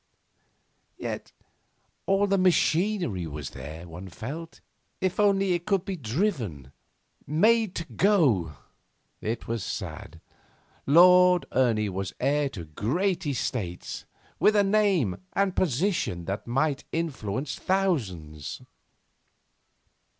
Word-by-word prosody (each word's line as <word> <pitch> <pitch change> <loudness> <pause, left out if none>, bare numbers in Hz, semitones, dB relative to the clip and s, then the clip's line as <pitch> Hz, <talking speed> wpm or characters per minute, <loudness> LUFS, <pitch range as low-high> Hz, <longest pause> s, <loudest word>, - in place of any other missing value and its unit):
Yet - - -5 0.8
all 195 +1 +3
the 195 -1 +2
machinery 175 - +2
was 75 -2 -6
there, 75 +6 -8
one 90 +3 -9
felt 145 - -7 0.4
if 185 +1 -1
only 195 -2 +3
it 175 0 -3
could 195 -3 +1
be 195 -1 -3
driven, 115 - -2 0.6
made 215 - +3
to 170 - -3
go. 150 - +2 0.7
It 115 +2 -3
was 115 -3 -2
sad. - - -6 0.7
Lord 180 +3 +7
Ernie 115 -5 +2
was 95 0 -4
heir 145 +2 +1
to 95 -10 -8
great 170 - -1
estates, 110 -9 -3 0.3
with 215 - +4
a 205 - +5
name 195 - +2
and 195 -2 +1
position 155 - 0
that 100 +5 -4
might 135 +3 0
influence 135 -5 -3
thousands. 95 - -2
145 Hz, 105 wpm, -27 LUFS, -, 0.8 s, Lord